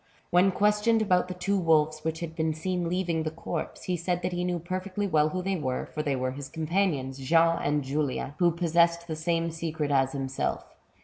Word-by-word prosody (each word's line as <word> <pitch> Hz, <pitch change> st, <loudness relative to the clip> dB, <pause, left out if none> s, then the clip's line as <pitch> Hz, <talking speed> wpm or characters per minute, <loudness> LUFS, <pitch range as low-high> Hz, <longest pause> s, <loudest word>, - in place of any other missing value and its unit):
When 180 Hz, +2 st, +5 dB
questioned 210 Hz, +3 st, +3 dB
about 180 Hz, -3 st, +2 dB
the 185 Hz, -, -5 dB
two 195 Hz, +2 st, 0 dB
wolves 155 Hz, -2 st, +3 dB
which 160 Hz, +1 st, -3 dB
had 165 Hz, -1 st, -5 dB
been 160 Hz, -1 st, 0 dB
seen 175 Hz, +1 st, -2 dB
leaving 175 Hz, -2 st, 0 dB
the 155 Hz, -, -1 dB
corpse, 160 Hz, 0 st, -5 dB
he 180 Hz, -, -1 dB
said 175 Hz, +1 st, -2 dB
that 180 Hz, -, -1 dB
he 175 Hz, 0 st, -2 dB
knew 180 Hz, -1 st, 0 dB
perfectly 185 Hz, +4 st, -3 dB
well 155 Hz, -5 st, +3 dB
who 185 Hz, +3 st, -3 dB
they 195 Hz, +1 st, 0 dB
were, 130 Hz, -7 st, -2 dB
for 155 Hz, -, -4 dB
they 145 Hz, -3 st, 0 dB
were 130 Hz, 0 st, -1 dB
his 140 Hz, +1 st, -7 dB
companions, 155 Hz, -5 st, -1 dB
Jean 165 Hz, +5 st, +3 dB
and 145 Hz, 0 st, 0 dB
Julian, 140 Hz, 0 st, -2 dB
who 175 Hz, -1 st, +5 dB
possessed 170 Hz, 0 st, +2 dB
the 160 Hz, -2 st, -4 dB
same 165 Hz, +1 st, 0 dB
secret 160 Hz, -2 st, -3 dB
as 135 Hz, -1 st, +2 dB
himself. 135 Hz, -1 st, -2 dB
165 Hz, 205 wpm, -28 LUFS, 150-180 Hz, -, When